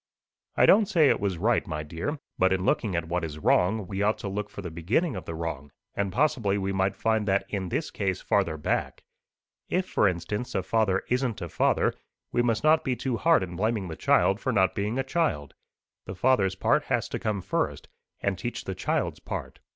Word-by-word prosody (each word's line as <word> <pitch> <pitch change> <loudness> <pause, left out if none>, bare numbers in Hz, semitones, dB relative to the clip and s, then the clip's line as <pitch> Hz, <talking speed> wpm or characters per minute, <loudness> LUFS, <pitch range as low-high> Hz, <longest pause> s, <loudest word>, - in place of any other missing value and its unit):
"I - - +6
don't 210 0 +6
say 165 -8 +4
it - - +2
was 95 -3 -1
right, 110 +6 +1
my 75 -1 -3
dear. 85 - -4 0.2
But 95 0 +4
in 95 0 0
looking 100 -3 +1
at 85 -1 -1
what 90 +1 -1
is 75 -2 -5
wrong, 95 +6 +2
we 95 +2 -4
ought 105 +1 +2
to - - -6
look 105 +1 -3
for 100 - -8
the 90 - -5
beginning 105 - 0
of 90 -4 -6
the 80 - -5
wrong; 75 -4 -5 0.2
and 100 -1 -1
possibly 120 -5 +1
we 95 0 -2
might 95 0 +1
find 110 -2 0
that 100 0 +2
in 95 -3 -3
this - - -2
case 95 -2 -1
farther 95 -6 0
back. 75 - -2 0.7
If, 185 +1 0
for 105 - +3
instance, 95 +6 -3
a 95 - 0
father 100 -3 +1
isn't 125 -3 0
a 85 -3 -5
father, - - +2 0.4
we 120 - +2
must 115 0 0
not 155 +1 +4
be 130 -2 0
too 130 0 -2
hard 165 - +4
in 90 -1 -6
blaming 105 -1 -1
the 80 - -5
child 100 +5 +3
for 130 - -1
not 95 -5 +3
being 105 +4 -2
a 135 - +1
child. 135 - -1 0.5
The 95 - -6
father's 95 -3 +2
part - - +2
has - - 0
to - - -3
come 105 -3 -1
first, - - -2 0.3
and 100 -3 -1
teach 120 +5 -4
the 95 - -4
child's - - -1
part. - - -6
100 Hz, 215 wpm, -27 LUFS, 90-120 Hz, 0.7 s, I